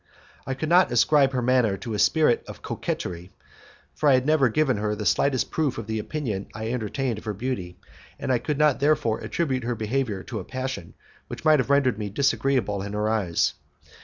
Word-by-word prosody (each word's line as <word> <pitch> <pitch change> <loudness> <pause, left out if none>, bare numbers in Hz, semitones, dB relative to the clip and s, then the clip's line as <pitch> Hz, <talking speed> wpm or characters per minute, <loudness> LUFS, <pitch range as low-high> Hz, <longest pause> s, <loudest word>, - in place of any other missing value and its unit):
I 135 - -2
could 155 +4 -3
not 175 -2 +4
ascribe 135 +3 +4
her 125 -1 0
manner 120 -5 +2
to 115 0 -6
a 105 - -2
spirit 155 0 +3
of - - -10
coquetry, 90 +1 -4 0.6
for 150 - +2
I 135 - +6
had 130 0 +1
never 150 -4 +3
given 135 -1 +1
her 105 0 -1
the 105 0 -5
slightest 135 +2 +1
proof 145 -5 0
of 115 - -5
the 110 0 -3
opinion 110 -6 -4
I 110 +1 -3
entertained 120 0 -2
of - - -17
her 105 -2 -3
beauty, 95 -6 -4 0.4
and - - -2
I 125 - +2
could 150 +2 -2
not 150 -2 +3
therefore 140 -6 +2
attribute 135 -7 -2
her 120 +1 -2
behaviour 110 -2 -2
to - - -5
a - - -6
passion 130 -9 -5 0.3
which - - -8
might 155 -1 +6
have 130 - -1
rendered 135 -6 +3
me 105 -1 -3
disagreeable 130 -3 0
in 100 +1 -5
her 105 +1 0
eyes; 100 -7 +1 0.3
M. - - -25
125 Hz, 210 wpm, -25 LUFS, 105-140 Hz, 0.6 s, I